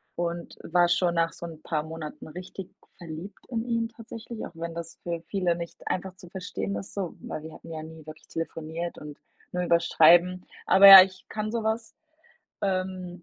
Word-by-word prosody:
und 170 0 -4
war 175 +1 +3
schon 175 0 +2
nach 165 0 +1
so 170 - -8
'n 160 -2 -9
paar 155 -2 -2
Monaten 160 -1 -8
richtig 180 +3 -9 0.2
verliebt 170 +3 -9
in 230 -2 -2
ihn 230 -1 -1
tatsächlich, 230 0 -8
auch - - -9
wenn 165 0 -6
das 170 0 -7
für 170 -1 -3
viele 180 -4 0
nicht 170 -1 -8
einfach 185 0 -3
zu 180 -1 -14
verstehen 100 - -4
ist 100 - -8
so, 190 -4 -4
weil 155 - -6
wir 160 - -9
hatten - - -13
ja 155 -1 -6
nie 160 -1 -11
wirklich 155 0 -12
telefoniert 165 +1 -5
und 150 -1 -10 0.3
nur 180 0 -1
über's 170 0 +2
Schreiben. 175 +3 +5 0.2
Aber 195 +1 +8
ja, 195 -1 +14
ich 185 0 -9
kann 215 0 -4
so 230 -1 -2
was. 220 +1 -2 0.7
Ähm, 185 -2 -2
175 Hz, 190 wpm, -27 LUFS, 165-190 Hz, 0.7 s, ja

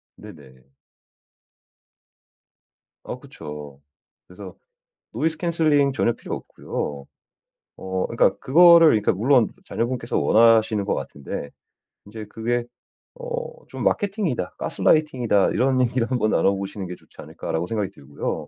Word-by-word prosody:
네네. 70 -10 -15 2.3
어 - - -7
그쵸. 75 -2 -10 0.5
그래서 90 0 -11 0.6
노이즈 155 +7 -1
캔슬링 155 -5 +2
전혀 120 -2 +1
필요 - - -6
없고요. 70 -1 -6 0.7
어 95 0 -3
그러니까 - - +2
그거를 170 +3 +7
그러니까 105 -5 +2
물론 120 +3 +3 0.2
자녀분께서 115 +2 -2
원하시는 110 -2 +4
것 - - 0
같은데 70 +1 -6 0.6
인제 105 +1 -9
그게 120 +3 -2 0.5
어 - - -5
좀 - - -6
마케팅이다 195 - -1
가스라이팅이다 125 -10 +2
이런 130 0 +2
얘기를 125 -1 0
한번 120 -4 +1
나눠보시는 100 0 0
게 90 - -6
좋지 - - -25
않을까라고 80 +1 -4
생각이 105 -3 -2
들고요. - - -5
115 Hz, 300 characters per minute, -23 LUFS, 95-140 Hz, 2.3 s, 그거를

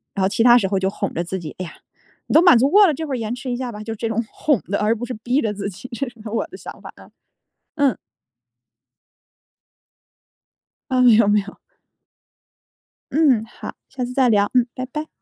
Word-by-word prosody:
然 195 - -1
后 - - +4
其 205 - -1
它 240 0 +7
时 205 -5 +1
候 195 0 0
就 190 0 0
哄 200 0 -4
着 170 - -2
自 180 +2 -4
己， 170 -4 -8
哎 185 - -3
呀， 165 - -11 0.5
你 - - -4
都 320 - +7
满 355 -8 +7
足 260 +4 +3
过 410 +2 +7
了， 315 - +1
这 320 - -4
会 285 - -4
儿 - - -1
延 225 -1 -3
迟 250 +1 -6
一 - - -1
下 250 0 -4
吧， 210 -1 -8
就 225 +1 -5
这 225 +1 -4
种 225 +1 -1
哄 290 -7 +1
的， 200 - -2
而 215 +2 +2
不 235 +2 -5
是 250 - -5
逼 245 +6 -1
着 220 -3 -1
自 200 0 -4
己， 200 +6 -10
这 255 +2 -3
是 240 - -23
我 225 +2 -2
的 - - -11
想 - - -10
法 - - -10
啊。 - - -16 0.7
嗯。 285 -4 +2 2.9
啊， 255 -1 +2
没 245 -3 +7
有 220 -1 +4
没 205 0 +4
有。 200 +1 -12 1.5
嗯， 270 -7 +3
好， 225 - -9 0.2
下 260 -1 -5
次 245 +1 -4
再 260 -1 +3
聊， 205 -2 +3
嗯， 250 -1 +3
拜 255 - -5
拜。 300 +4 -6
235 Hz, 240 characters per minute, -21 LUFS, 210-255 Hz, 2.9 s, 它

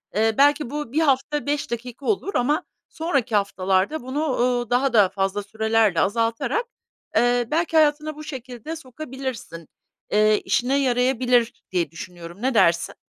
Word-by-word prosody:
Eee, 220 +1 +2
belki 290 -1 +4
bu 295 -3 -5
bir 310 - +2
hafta 285 0 +1
5 290 -2 -2
dakika 245 +3 -6
olur 400 -1 -1
ama 295 +8 +1 0.3
sonraki 280 -9 -1
haftalarda 195 +6 +1
bunu, 275 +2 -2 0.3
eee, 240 - -17
daha 245 -6 +3
fazla 195 +1 -2
sürelerle 220 -3 +1
azaltarak, 230 - 0 0.5
eee, 245 0 +3
belki 330 +1 +1
hayatına 305 0 +2
bu 305 - -9
şekilde 260 0 -7
sokabilirsin, 260 - -7 0.4
eee, 215 0 +3
işine 245 +7 +1
yarayabilir 250 -2 +1
diye 170 -5 0
düşünüyorum. 170 +2 -10
Ne 260 +2 +1
dersin? 170 -6 +3
245 Hz, 135 wpm, -23 LUFS, 215-290 Hz, 0.5 s, belki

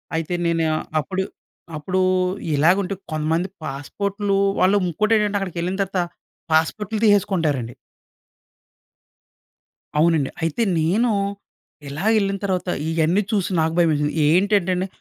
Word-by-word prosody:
అయితే 165 +2 -2
నేను 165 -1 +1 0.3
అప్పుడు 190 +5 -2 0.5
అప్పుడు 185 +5 -2 0.5
ఇలాగుంటే 180 +6 +2 0.2
కొంతమంది 160 +4 0 0.2
పాస్‌పోర్ట్‌లు 200 +8 -2 0.2
వాళ్ళు 190 +3 +4
ఇంకోటేంటంటే 210 +3 +1
అక్కడికి 180 -3 -5
వెళ్ళిన 180 +3 -2
తర్వాత 195 -1 -1 0.5
పాస్‌పోర్ట్‌లు 210 +7 +1
తీసేసుకుంటారండి. 165 - +2 2.2
అవునండి. 160 -3 +3
అయితే 165 +8 0 0.2
నేను 210 +9 +2 0.8
ఇలా 150 +8 -5
ఏళ్ళిన 195 -1 0
తర్వాత 185 -2 -1 0.2
ఇయన్నీ 165 +4 +2
చూసి, 200 -4 0
నాకు 160 +1 0
భయమేసింది. 150 -3 +2 0.2
ఏంటంటే 190 +1 +3
అండి, 185 +2 -1
180 Hz, 105 wpm, -22 LUFS, 160-200 Hz, 2.2 s, వాళ్ళు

